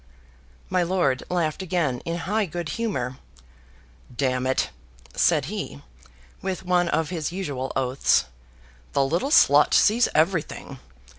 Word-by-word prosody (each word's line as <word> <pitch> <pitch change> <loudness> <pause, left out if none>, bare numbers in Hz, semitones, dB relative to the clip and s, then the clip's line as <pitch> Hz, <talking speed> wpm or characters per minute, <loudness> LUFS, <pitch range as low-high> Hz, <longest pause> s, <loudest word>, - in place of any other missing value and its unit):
My 185 -1 +1
lord 175 -7 +1
laughed 170 -2 -1
again, 165 -9 -1
in 165 0 -2
high 210 +1 0
good 170 -1 -5
humor. 130 - -3 1.0
"D 140 - +1
it!" 130 0 0 0.4
said - - +3
he, 70 +2 -6 0.6
with 190 -1 -3
one 180 -1 +2
of 160 +1 0
his 165 -3 -3
usual 145 -8 -4
oaths, 130 0 +2 0.7
"the 140 - +3
little 170 - 0
slut 305 - +5
sees 230 +3 +4
everything. 155 -4 0
165 Hz, 125 wpm, -24 LUFS, 135-185 Hz, 1.0 s, slut